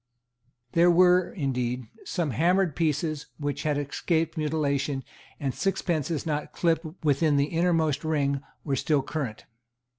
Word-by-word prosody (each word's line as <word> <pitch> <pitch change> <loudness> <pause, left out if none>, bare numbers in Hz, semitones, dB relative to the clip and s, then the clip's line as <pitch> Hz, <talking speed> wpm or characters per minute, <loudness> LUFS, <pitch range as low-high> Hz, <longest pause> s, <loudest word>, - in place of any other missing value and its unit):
There 170 +1 +5
were, 180 +1 +5
indeed, 125 - -2 0.2
some 170 -6 -1
hammered 175 - +2
pieces 155 -1 -1
which 145 -1 -3
had 150 -2 0
escaped 160 +3 -1
mutilation; 145 -3 -1 0.4
and 135 -2 -1
sixpences 170 -5 -1
not 150 -2 -2
clipped 165 -1 +1 0.2
within 145 +1 +3
the 140 - +3
innermost 165 -4 +2
ring 140 -3 0 0.2
were 140 -3 0
still 145 +1 +1
current. 135 -7 -4
155 Hz, 125 wpm, -27 LUFS, 140-165 Hz, 0.4 s, There